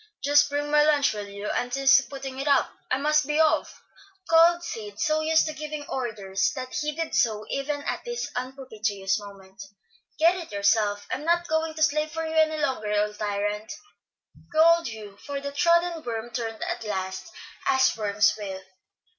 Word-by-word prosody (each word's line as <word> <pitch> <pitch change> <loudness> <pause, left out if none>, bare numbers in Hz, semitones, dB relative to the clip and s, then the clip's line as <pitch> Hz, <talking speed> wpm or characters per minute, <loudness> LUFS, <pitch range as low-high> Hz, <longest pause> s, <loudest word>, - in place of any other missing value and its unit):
"Just 290 +1 +4
bring 290 +1 -2
my 300 0 +5
lunch, 295 -4 +3
will 205 -1 -6
you? 200 +1 -8
Auntie 245 +2 -2
is 270 0 +7
putting 270 -1 -7
it 275 - -3
up; 280 -2 +3 0.2
I 255 - +2
must 300 0 +2
be 300 +1 0
off," 315 -1 +1 0.4
called 340 +1 +5
Sid, 210 -8 -7
so 310 -1 +1
used 320 0 +3
to 310 - -3
giving 305 -1 -6
orders 210 -5 -2
that 255 -1 -6
he 300 0 -1
did 325 +1 -4
so 215 -2 +1
even 285 +1 -2
at - - -3
this 480 0 -4
unpropitious 220 -7 -2
moment. 195 -1 -13 0.6
"Get 335 +3 +5
it 335 -9 -8
yourself. 205 0 +1
I'm 285 - -3
not 345 +1 +1
going 315 0 -1
to 315 - +1
slave 305 0 +1
for 325 +1 -3
you 320 - -4
any 315 -1 +3
longer, 260 -8 -1
old 210 0 0
tyrant," 210 +2 -2 0.8
growled 335 +1 +4
Hugh; 215 -3 -9
for 285 -1 -4
the 280 0 -5
trodden 340 +2 +2
worm 235 0 -5
turned 225 -1 -4
at - - -3
last, 190 - -4 0.4
as 265 0 +3
worms 210 -1 +2
will. 190 -2 -6
275 Hz, 180 wpm, -26 LUFS, 210-310 Hz, 0.8 s, is